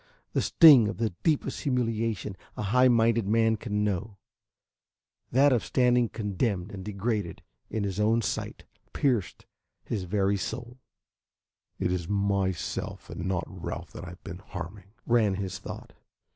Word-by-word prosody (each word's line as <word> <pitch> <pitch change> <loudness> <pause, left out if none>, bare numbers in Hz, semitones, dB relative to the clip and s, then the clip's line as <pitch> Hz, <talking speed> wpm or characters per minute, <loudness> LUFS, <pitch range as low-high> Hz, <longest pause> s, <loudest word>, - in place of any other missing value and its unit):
The - - +2
sting 145 -10 +8
of 100 -4 -4
the 110 -1 0
deepest 155 -4 0
humiliation 115 -6 -1 0.2
a - - -2
high 125 +6 +4
minded 115 -3 +3
man 110 +1 +3
can 105 -1 -2
know, 105 +1 -2 1.1
that 135 +2 +5
of 120 - +1
standing 125 -2 +3
condemned 100 -2 -2
and 95 -2 -7
degraded 105 -2 -3 0.3
in 110 - -2
his 100 0 -3
own 110 +2 +3
sight, - - -3 0.3
pierced 120 -9 0 0.4
his 100 -5 -3
very 100 +2 +1
soul. 120 +5 -5 1.0
"It 90 -2 0
is 90 -2 -2
myself 100 -3 -1
and 90 - -4
not 95 -2 -1
Ralph - - -7
that - - -9
I 90 - -7
have 90 - -13
been 90 +1 -7
harming," 95 +1 -8 0.2
ran 110 -5 +3
his 95 -1 -4
thought. - - -9
105 Hz, 145 wpm, -28 LUFS, 95-115 Hz, 1.1 s, sting